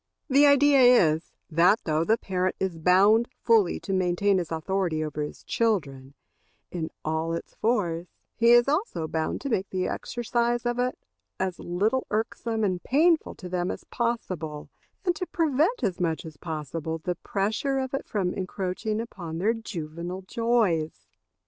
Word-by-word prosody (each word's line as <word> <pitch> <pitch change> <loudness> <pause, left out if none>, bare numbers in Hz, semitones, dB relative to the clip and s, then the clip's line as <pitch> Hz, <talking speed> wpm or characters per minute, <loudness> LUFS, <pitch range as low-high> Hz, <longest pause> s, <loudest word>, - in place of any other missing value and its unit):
The 285 +2 +6
idea 285 0 +5
is, 185 -11 +5 0.2
that 175 +7 +4
though 155 0 +1
the 220 +6 +2
parent 185 -3 -1
is 185 -4 -2
bound 200 +7 +5 0.2
fully 225 -6 +3
to 195 - -3
maintain 185 +1 +2
his 170 -2 -5
authority 165 0 -1
over 150 -1 -4
his 150 - -6
children, 140 - -1 0.6
in 165 -3 -3 0.2
all 160 +1 -1
its 165 - -6
force, 180 -7 0 0.3
he 235 0 +3
is 240 +1 +6
also 295 - -1
bound 160 0 -2
to 280 - -3
make 195 -5 -1
the 185 -1 -1
exercise 240 0 -1
of 240 0 -1
it 250 0 0 0.4
as 185 -2 -2
little 210 +9 0
irksome 225 +1 -2
and 185 -3 0
painful 320 +4 +2
to 185 - -9
them 180 0 -1
as - - -5
possible, 185 -11 -3 0.3
and 355 -1 +2
to 365 - -3
prevent 320 - +1
as 190 -5 -1
much 165 -2 -1
as 160 -1 -9
possible 160 +1 -4
the 180 +3 -3
pressure 215 +10 -1
of 260 0 -3
it 275 - -3
from 190 -4 -1
encroaching 190 +3 -3
upon 175 -8 -6
their 210 +7 +2
juvenile 175 -4 -6
joys. 205 -7 0
190 Hz, 160 wpm, -26 LUFS, 165-235 Hz, 0.6 s, The